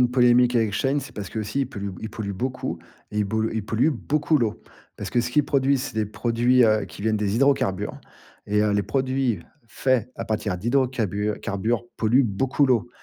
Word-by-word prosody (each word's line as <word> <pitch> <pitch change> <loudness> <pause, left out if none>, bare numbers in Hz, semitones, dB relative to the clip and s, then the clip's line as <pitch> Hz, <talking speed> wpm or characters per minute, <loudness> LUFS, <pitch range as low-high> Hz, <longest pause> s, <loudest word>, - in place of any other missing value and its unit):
une 120 - 0
polémique 125 -1 +4
avec 110 -3 +2
Shein, 135 +7 +1
c'est 135 - -10
parce 100 -2 -5
qu'aussi 110 +5 -3
ils - - -2
polluent 100 -5 -5
b 95 - -10
ils 110 - -4
polluent 100 -2 -4
beaucoup 125 +6 -3 0.3
et 105 - -3
ils 105 - +2
bol 110 +2 -1
ils 110 -2 -3
polluent 115 +8 +2
beaucoup 150 +3 +1
l'eau. 115 -4 -1 0.3
Parce - - -6
que, 120 - +2
ce 120 - -3
qu'ils 150 +4 +3
produisent, 135 -1 +2
c'est 130 - -6
des 110 -1 0
produits 120 +4 +2
heu, 110 -1 +3
qui 85 +3 -11
viennent 110 0 +1
des 105 -1 0
hydrocarbures 130 -8 +1 0.5
et 105 +1 +2
heu, 105 -1 +2
les 100 - +2
produits 130 -4 0 0.3
faits 125 0 0
à 115 - -4
partir 105 -3 -2
d'hydrocabures 110 -2 0
carbures, 110 +4 -1
polluent 120 +5 +4
beaucoup 130 +6 +1
l'eau 120 -3 +2
115 Hz, 205 wpm, -24 LUFS, 105-130 Hz, 0.5 s, polémique